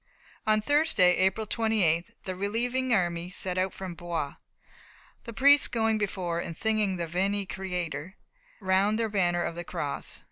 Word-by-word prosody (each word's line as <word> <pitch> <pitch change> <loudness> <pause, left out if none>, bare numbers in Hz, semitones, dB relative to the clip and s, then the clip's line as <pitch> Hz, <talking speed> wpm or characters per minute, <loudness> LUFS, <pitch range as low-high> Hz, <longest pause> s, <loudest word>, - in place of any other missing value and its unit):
On 215 0 +3
Thursday, 255 - +4
April 190 +4 +1
28th, 205 -7 0
the 185 - -4
relieving 240 +6 -1
army 175 -4 +1
set 185 0 -2
out 190 0 0
from 190 -2 -7
Blois, 170 -4 -4 0.9
the 235 - -6
priests 280 +4 +6
going 225 -2 +1
before 185 -4 -2
and 170 -2 -5
singing 215 -3 +1
the 170 -1 -2
Veni 195 +4 -1
Creator 180 -3 -5 0.4
round 195 +2 +2
their 225 -1 0
banner 175 -4 +1
of - - -3
the 170 +1 -6
Cross. - - -4
190 Hz, 150 wpm, -28 LUFS, 175-220 Hz, 0.9 s, priests